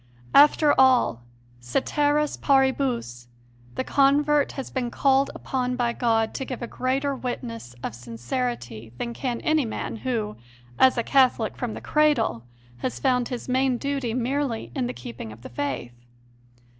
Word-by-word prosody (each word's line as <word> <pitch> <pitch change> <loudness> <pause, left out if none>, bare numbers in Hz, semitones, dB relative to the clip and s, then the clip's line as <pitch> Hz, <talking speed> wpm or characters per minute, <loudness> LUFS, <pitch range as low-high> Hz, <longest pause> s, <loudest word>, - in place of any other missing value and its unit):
After 295 +1 +6
all, 255 - +4 0.4
ceteris 290 - 0
paribus, 260 - +1 0.5
the - - -1
convert 285 +2 +3
has 270 - -6
been 250 -3 -2
called 270 +2 +2
upon 250 -1 -2
by 240 -1 0
God 225 -2 +1
to 270 - -3
give 255 -2 -6
a - - -3
greater 270 +3 -1
witness 235 - -6
of - - -3
sincerity 120 -1 -5
than 235 - -4
can 245 -1 -3
any 310 -1 +2
man, 225 0 -4
who, 220 -3 -3 0.4
as 260 -1 +5
a 235 - +1
Catholic 255 -5 +3
from 240 -3 -4
the - - -7
cradle, 295 - +2 0.3
has 125 0 -3
found 250 - +1
his 245 -2 -6
main 260 0 +2
duty 275 -4 -2
merely 250 - -2
in 120 - -1
the 125 - -4
keeping 115 -2 -8
of 110 +2 -13
the - - -8
Faith. 125 -1 -4
245 Hz, 150 wpm, -25 LUFS, -, 0.5 s, After